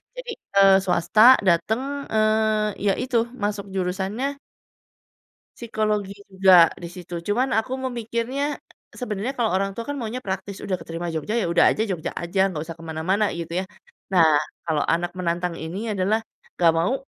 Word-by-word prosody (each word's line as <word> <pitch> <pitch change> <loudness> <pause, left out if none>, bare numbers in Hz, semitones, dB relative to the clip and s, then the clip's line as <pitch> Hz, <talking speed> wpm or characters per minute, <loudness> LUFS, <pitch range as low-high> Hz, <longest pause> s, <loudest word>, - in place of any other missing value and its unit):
Jadi, - - -6 0.2
eee, 195 -1 +7
swasta 215 +8 +6
datang, 255 +11 0
eee, 215 0 +2
ya 200 -1 +2
itu 255 -2 0 0.3
masuk 205 -1 -2
jurusannya 195 +9 -2 1.2
psikologi 215 -3 -2
juga 190 -3 +7 0.2
di 170 - -6
situ, 175 0 -10 0.2
cuman 250 +5 +1
aku 225 +4 0
memikirnya, 245 +4 -2 0.4
sebenernya 225 +1 -3
kalau 230 -5 +1
orang 195 +1 +1
tua 230 - -4
kan - - -1
maunya 230 +2 -4
praktis, 190 0 -4
udah 185 -2 -1
keterima 165 +1 -5
Jogja, 160 +9 -2
ya 230 - +1
udah - - +5
aja - - 0
Jogja 175 -5 -3
aja, 175 +3 -3
gak 160 -5 -4
usah 165 - -6
ke - - -11
mana-mana 185 +7 0
gitu 170 +2 -3
ya. - - -6 0.5
Nah, 175 -3 +6 0.4
kalau 155 -3 0
anak 175 +1 -1
menantang 175 -1 -2
ini 205 +7 -4
adalah, 200 +3 +1 0.4
"Gak 170 -2 +5
mau, 165 +9 +1
200 Hz, 160 wpm, -23 LUFS, 175-225 Hz, 1.2 s, eee